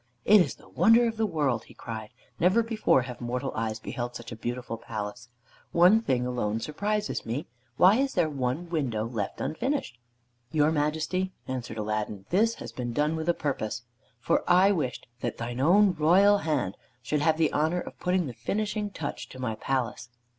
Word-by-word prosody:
"It 210 -1 +7
is - - -1
the - - -19
wonder 230 +2 +5
of 225 -1 -3
the 220 -1 +1
world," 145 - 0
he - - -16
cried. 110 -2 -6 0.3
"Never 185 +7 +4
before 220 - +2
have 125 -1 -8
mortal 125 +3 -2
eyes 110 -1 -2
beheld 120 +2 -5
such 120 0 -8
a - - -5
beautiful 120 +1 -4
palace. 110 +1 -6 0.4
One 180 +6 +6
thing 125 - 0
alone 115 -3 -1
surprises 205 - -2
me. 120 +6 -3 0.3
Why 190 +5 +6
is 270 +1 0
there 175 -3 +3
one 140 +3 -2
window 130 -10 -1
left 115 -4 -4
unfinished?" 160 - -2 0.5
"Your 155 0 +3
Majesty," 160 +5 -1
answered 125 -3 -4
Aladdin, 105 -2 -3
"this 225 +5 +3
has - - -8
been 120 -2 -4
done 150 +4 +1
with 160 +1 -2
a 170 - +3
purpose, 120 -5 -3 0.4
for - - +1
I 185 +3 +6
wished 150 -10 -2
that - - -3
thine 120 +1 -4
own 190 +7 +5
royal 185 +6 +5
hand 145 - -1 0.3
should 145 +5 0
have 155 +1 +3
the 160 -1 +2
honor 160 +4 +1
of - - -10
putting 180 -1 +1
the 130 - -5
finishing 210 - -2
touch 160 -7 -5
to - - -11
my 125 -3 -2
palace." 125 +1 -2
150 Hz, 185 wpm, -28 LUFS, 120-185 Hz, 0.5 s, It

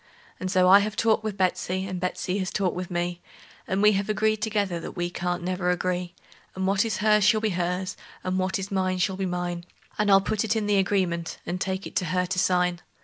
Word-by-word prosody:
And 185 - -3
so 185 -1 +4
I 195 +2 +9
have 210 0 -2
talked 220 -1 +2
with 215 -2 -3
Betsey, 185 0 0
and 185 -1 -4
Betsey 185 +1 -2
has 185 -2 -2
talked 190 -3 -1
with 180 0 -4
me, 175 0 -2 0.5
And 190 +2 0
we 210 - +7
have 200 +1 -1
agreed 215 +1 +2
together 205 -5 0
that - - -7
we 175 0 -1
can't 175 0 -2
never 180 0 -1
agree; 180 0 -1 0.4
And 190 0 -2
what 195 +2 +3
is 225 -2 -2
hers 210 -1 +5
shall 215 +2 +5
be 220 0 0
hers, 180 +2 -2 0.3
and 185 0 -1
what 185 +1 0
is 195 +1 -6
mine 185 -1 0
shall 185 +1 0
be 190 0 -2
mine; 175 -1 -3 0.4
And 210 -1 +2
I'll 195 -1 +7
put 205 +1 -1
it 220 - 0
in 220 -2 0
the 205 -1 +2
agreement, 180 -4 0
and 180 +2 -4
take 190 0 -2
it - - -9
to 180 - +1
her 180 +3 0
to 185 +1 -2
sign. 180 -1 +1
185 Hz, 235 wpm, -26 LUFS, 180-200 Hz, 0.5 s, I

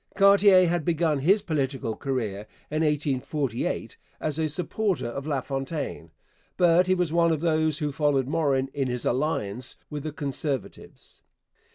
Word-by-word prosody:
Cartier 195 -2 +6
had 170 -1 0
begun 160 -2 +1
his 195 +9 +3
political 135 -8 -2
career 110 -7 -3 0.2
in 155 +1 0
1848 140 -4 -1 0.2
as 155 0 -2
a 155 -1 +1
supporter 180 - -1
of 135 +5 -5
LaFontaine, 135 - -3 0.5
but 175 0 +4
he 185 - +3
was 175 -3 0
one 170 -1 +3
of 155 -2 -1
those 155 -2 +1
who 150 -1 -2
followed 140 -2 +1
Morin 140 -4 0
in 135 -2 -1
his 125 -1 -2
alliance 125 -3 -1
with 150 -1 -4
the 155 +2 -4
Conservatives. 140 -1 -5
150 Hz, 145 wpm, -26 LUFS, 135-165 Hz, 0.5 s, Cartier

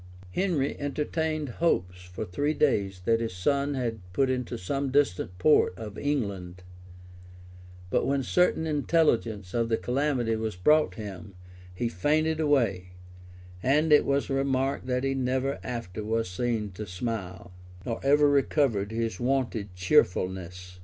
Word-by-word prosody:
[] 90 0 -18
Henry 165 - 0
entertained 155 +1 -2
hopes 90 - 0
for 90 +4 -6
three 145 +12 -1
days 100 -10 +1
that 115 0 +3
his 115 -5 -3
son 140 +9 0
had 115 -4 -2
put 130 +6 +2
into 125 -2 -3
some 135 +9 -2
distant 110 -10 +1
port 150 -6 +4
of 105 -3 -7
England; 100 -11 -3 1.3
but - - +1
when 140 -1 +1
certain 180 +1 +2
intelligence 140 - +1
of 115 -1 0
the 115 - +2
calamity 125 -3 0
was 110 -2 -3
brought 150 +12 +3
him, 100 -3 -8 0.4
he 90 +6 -2
fainted 155 - +1
away; 115 - +1 0.7
and 150 +6 +3
it 150 - +7
was 140 0 +1
remarked, 135 -1 0
that 125 0 0
he 135 0 +1
never 130 +1 -1
after 115 -5 -5
was 115 0 -1
seen 110 +2 -2
to 105 +3 -7
smile, 90 -2 -5 0.3
nor 115 -1 -3
ever 145 +2 +5
recovered 135 -7 +2
his 115 0 -2
wonted 120 -6 -1
cheerfulness. 90 0 0
120 Hz, 140 wpm, -27 LUFS, 95-140 Hz, 1.3 s, it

